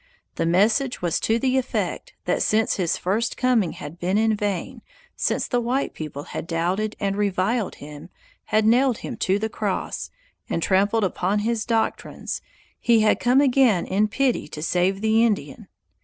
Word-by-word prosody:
The - - -1
message 215 +8 +2
was 170 -2 +1
to 225 - +1
the 260 +2 +2
effect 260 - -3
that - - 0
since 220 +1 +2
his 175 -4 0
first 220 +6 -1
coming 240 -9 +2
had 150 +4 -9
been 185 +3 0
in 220 0 +3
vain, 205 +4 -3 0.3
since - - -1
the 245 -1 0
white 250 +4 -1
people 150 -2 -6
had 165 - -6
doubted 180 +6 -1
and 195 -1 -1
reviled 205 +2 0
him, 145 0 -11 0.4
had 215 0 +2
nailed 245 +1 +4
him - - -5
to 190 +1 +1
the 220 +2 -1
cross, 210 -3 -3 0.4
and 165 - -1
trampled 205 +3 +2
upon 190 +1 0
his 230 -1 -1
doctrines, 225 -1 -2 0.4
he 230 -2 +4
had 215 - +3
come 250 +3 +4
again 255 -9 +3
in 205 +3 +1
pity 255 +3 0
to 150 - -7
save 180 +4 +1
the 220 +1 +3
Indian. 200 - -1
215 Hz, 170 wpm, -23 LUFS, 185-235 Hz, 0.4 s, nailed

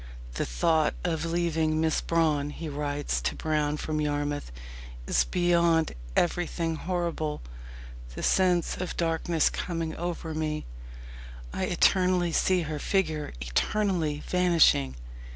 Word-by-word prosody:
"The - - -2
thought 155 - +2
of 165 -2 -1
leaving 165 -2 0
Miss 160 -1 +1
Brawne," 155 -4 +1
he 160 +2 -6
writes 145 0 -2
to - - -1
Brown 150 -1 0
from 155 0 -2
Yarmouth, 145 - -2 0.5
"is - - +2
beyond 170 -2 +2 0.2
everything 170 -1 0
horrible 170 -3 -2 0.7
the - - -5
sense 180 -3 +2
of 180 -1 -4
darkness 165 -1 +1
coming 165 -2 -3
over 170 -1 -4
me 155 -1 -2 0.9
I - - -1
eternally 180 -2 +3
see 185 +2 +2
her 150 -1 -4
figure 155 -4 -1
eternally 155 - 0
vanishing." 170 - +3
160 Hz, 115 wpm, -28 LUFS, 150-175 Hz, 0.9 s, eternally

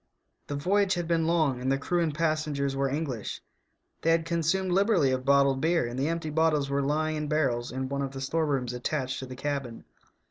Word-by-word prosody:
The 145 - -3
voyage 190 +6 +2
had 175 -1 -3
been 165 -1 +1
long 155 -7 +1
and 130 +1 0
the 135 - +2
crew 175 +5 0
and 165 -2 +1
pas 155 0 0
sengers 140 -2 -2
were 135 0 0
English; 135 -6 -3 0.6
they 165 - +1
had 165 0 +3
consumed 170 +3 0
liberally 190 - +3
of 130 0 -2
bottled 140 -1 +4
beer, 165 -2 +2
and 120 +2 -4
the 140 - +1
empty 165 -1 -2
bottles 150 -3 +2
were 140 0 +1
lying 155 +2 0
in 150 0 -3
barrels 130 -6 0
in 130 +1 -3
one 140 +1 -2
of 135 -1 -3
the 135 - -6
store 160 +4 0
rooms 130 -4 -1
attached 130 +1 -2
to 130 - -6
the 130 - -8
cabin. 135 -3 -4
145 Hz, 220 wpm, -28 LUFS, 135-165 Hz, 0.6 s, bottled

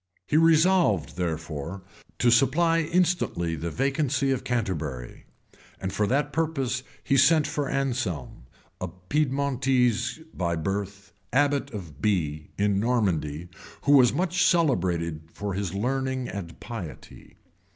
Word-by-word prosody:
[] - - -44
He - - 0
resolved, 165 - +4
therefore, 80 +1 -4 0.3
to 120 - +3
supply 155 +8 +4
instantly 165 - +1
the 85 +2 -4
vacancy 135 - 0
of 130 - -1
Canterbury; 80 - -3 0.5
and 95 - -4
for 105 - +1
that 145 +4 0
purpose 135 -6 -1 0.2
he 135 - +1
sent 150 +3 +5
for 145 -2 -2
Anselm, 120 - -2 0.4
a 90 - -2
Piedmontese 130 - 0
by 85 -2 -1
birth, 95 +2 -4 0.2
abbot 145 +2 +2
of 85 - -8
Bee, 80 -8 0
in 100 -1 +2
Normandy, 90 -9 0 0.4
who 145 - +2
was 130 -4 +7
much 175 +5 +1
celebrated 90 - +1
for 100 -1 -4
his 95 -1 -3
learning 130 +3 -1
and 90 -4 -7
piety. 105 -10 -9
120 Hz, 125 wpm, -26 LUFS, 90-140 Hz, 0.5 s, was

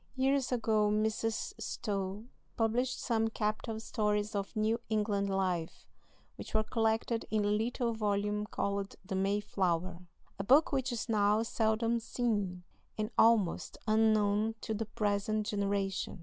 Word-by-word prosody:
Years 265 0 +1
ago 220 -3 +2
Mrs. 220 +1 0
Stowe 200 0 -3 0.3
published 240 +3 +1
some 225 -2 +1
capital 220 0 -2
stories 210 -1 -1
of 200 +2 -3
New 220 +2 +1
England 205 -2 0
life, 185 -4 -1 0.5
which - - -7
were 215 - +3
collected 225 +1 0
in 215 -1 +1
a - - +2
little 230 +2 0
volume 210 -1 -1
called 200 -2 -2
"The 190 - -5
Mayflower," 190 -3 0 0.4
a - - -1
book 275 +10 +5
which 265 -2 0
is 235 -1 -3
now 210 0 +3
seldom 225 +1 +1
seen, 205 -6 -2 0.3
and 215 +1 -2
almost 220 -6 +3
unknown 215 0 +3
to 220 - -3
the 215 0 -3
present 210 0 0
generation. 200 -2 -1
215 Hz, 135 wpm, -32 LUFS, 200-225 Hz, 0.5 s, book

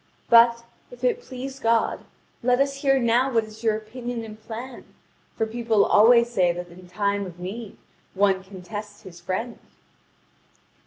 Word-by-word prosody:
But, 235 0 +6 0.3
if - - -14
it 485 -1 +1
please 270 - -8
God, 230 -1 +1 0.4
let 250 +1 +2
us 275 0 +1
hear 270 -1 +3
now 245 +2 +2
what 230 -2 +2
is 215 +1 -13
your 220 -2 +2
opinion 235 +2 -6
and 215 -1 -10
plan; 240 +3 -8 0.5
for 225 - +1
people 225 -2 +1
always 235 +3 +6
say 180 -6 +3
that 175 0 -6
in 180 +1 -14
time 200 +1 -1
of 175 -1 -11
need 200 +4 -7 0.4
one 190 -1 +2
can 190 -1 -12
test 205 +1 -8
his 175 -3 -12
friend." 190 +7 -4
225 Hz, 160 wpm, -24 LUFS, 200-240 Hz, 0.5 s, But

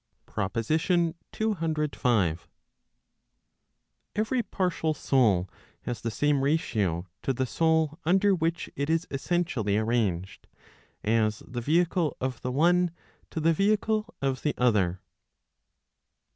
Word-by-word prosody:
PROPOSITION 155 - 0 0.2
CCV. 150 - 0 1.8
Every 220 +4 +1
partial 180 -7 -1
soul 110 -11 +2 0.4
has 120 - -4
the 115 - -2
same 145 +4 +1
ratio 105 - 0 0.2
to - - 0
the 130 +1 -1
soul 160 +2 +1
under 195 +4 +4
which 165 -1 -1
it 140 +1 -2
is 165 +2 +1
essentially 135 - 0
arranged, 110 -5 -1 0.6
as 110 -1 +1
the 120 -1 -4
vehicle 165 +2 +1
of 130 0 -3
the 125 - -2
one 175 +6 +3 0.4
to - - -4
the 165 +1 +3
vehicle 215 +4 +1
of 135 -1 0
the 150 - 0
other. 100 -7 +2
150 Hz, 110 wpm, -27 LUFS, 115-170 Hz, 1.8 s, under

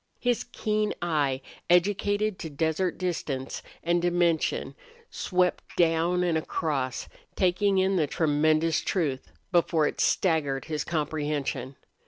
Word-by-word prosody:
His 245 -1 0
keen 215 -3 -1
eye, 145 -6 0 0.3
educated 205 +3 +2
to 160 - -5
desert 160 +4 -1
distance 150 -7 -3 0.2
and 175 +1 +2
dimension 175 -2 +1 0.4
swept 180 -1 +1 0.2
down 170 +1 +3
and 170 -3 +2
across, 140 -5 -2 0.3
taking 190 +2 +2
in 190 0 +2
the 155 -4 +2
tremendous 155 +2 +2
truth, 145 -8 -2 0.2
before 170 -3 +3
it - - -1
staggered 150 -7 +1
his 155 -2 -2
comprehension. 150 -4 -2
165 Hz, 115 wpm, -27 LUFS, 150-180 Hz, 0.4 s, down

